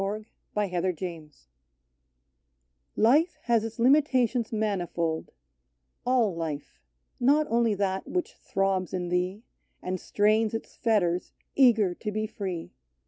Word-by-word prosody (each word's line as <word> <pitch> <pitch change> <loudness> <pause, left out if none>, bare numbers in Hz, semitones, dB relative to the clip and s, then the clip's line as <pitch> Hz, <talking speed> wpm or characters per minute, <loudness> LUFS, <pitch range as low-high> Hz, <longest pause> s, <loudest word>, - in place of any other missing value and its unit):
44 210 +1 -4
TO - - -1
HELEN - - -10
KELLER 180 +1 0
T 165 -3 -6 1.7
IFE 305 +9 +4
has 235 -2 +2
its 225 +1 -6
limitations 255 -3 +3
manifold: 175 -7 -1 0.8
All 245 -6 +3
life; 150 - -5 0.4
not 290 +5 +4
only 230 -2 +3
that 190 -1 -1
which 360 -1 -2
throbs 190 -2 -1
in 180 -1 -3
thee, 180 +4 -1 0.4
And 185 0 -3
strains 215 +3 +2
its 225 - -6
fetters, 185 -6 +1 0.2
eager 225 -8 +5
to 210 +4 -5
be 215 +1 -1
free. 185 -6 -5
210 Hz, 125 wpm, -27 LUFS, 180-230 Hz, 1.7 s, eager